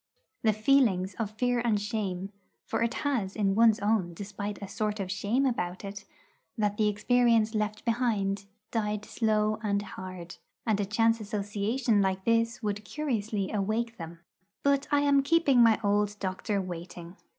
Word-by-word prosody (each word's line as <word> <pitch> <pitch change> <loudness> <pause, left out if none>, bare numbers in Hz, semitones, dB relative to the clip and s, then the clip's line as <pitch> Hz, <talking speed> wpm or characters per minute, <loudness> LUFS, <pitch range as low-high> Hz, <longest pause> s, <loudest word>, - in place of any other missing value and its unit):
The 220 - +4
feelings 215 -5 +2
of 220 -3 -1
fear 245 +3 0
and 220 -4 +2
shame 200 -3 -3 0.3
for - - -2
it 230 +1 0
has 230 -10 0
in 200 -3 +1
one's 225 0 +5
own 205 -5 +1
despite 205 +1 -5
a 200 - -6
sort 210 +1 -2
of 190 -2 -3
shame 210 +7 0
about 185 -7 -2
it 200 +1 -7 0.5
that 210 -1 0
the 215 - +3
experience 230 +1 +3
left 215 0 -2
behind, 210 -5 0 0.3
died 210 -2 -1
slow 215 -1 +1
and 200 -2 0
hard. 185 -3 -8 0.3
And 215 -3 +1
a 205 - +1
chance 225 +3 +2
association 210 +2 0
like 190 -1 0
this 230 +1 +1
would 205 0 -2
curiously 220 -7 -2
awake 220 +3 -1
them. 165 0 -9 0.4
But 280 0 +2
I 290 -1 +3
am 285 -1 +4
keeping 280 -4 +4
my 230 -2 +5
old 205 0 +1
doctor 195 +2 -2
waiting. 175 -1 -7
210 Hz, 160 wpm, -29 LUFS, 200-230 Hz, 0.5 s, one's